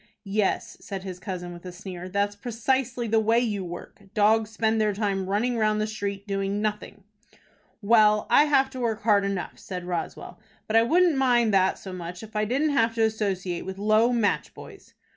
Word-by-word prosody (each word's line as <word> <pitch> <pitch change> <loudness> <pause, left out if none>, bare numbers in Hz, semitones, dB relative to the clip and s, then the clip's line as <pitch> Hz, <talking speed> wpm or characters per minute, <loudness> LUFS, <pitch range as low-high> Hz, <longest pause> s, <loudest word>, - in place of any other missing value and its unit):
"Yes," 200 0 -1
said 195 -2 -6
his 185 -2 -7
cousin, 180 -2 -6
with 175 - -12
a 180 - -7
sneer, 180 -1 -8
"that's 200 +2 0
precisely 240 +2 -1
the 225 0 +3
way 225 +1 +2
you 215 -5 0
work. 175 +2 -9
Dogs 215 +1 +3
spend 220 0 0
their 210 -1 +2
time 195 -2 -2
running 235 +5 0
round 215 -1 +2
the 215 - +1
street 200 -2 -4
doing 195 0 -2
nothing." 210 -1 -4 0.8
"Well, 210 -1 +4
I 295 - +5
have 270 -3 +2
to 260 - -7
work 230 -3 -2
hard 205 -2 +4
enough," 195 -2 -4
said 180 -2 -6
Roswell, 175 -2 -5 0.3
"but 220 - -2
I 225 - +7
wouldn't 335 +5 +3
mind 240 -5 +3
that 190 -1 +3
so 190 - -9
much, 180 +2 -7
if 220 0 -12
I 210 0 +1
didn't 280 +7 +1
have 230 -5 +2
to 225 - +2
associate 195 -5 -1
with 190 0 -6
low 215 +4 +3
match 230 -4 0
boys." - - -13
210 Hz, 195 wpm, -26 LUFS, 195-225 Hz, 0.8 s, I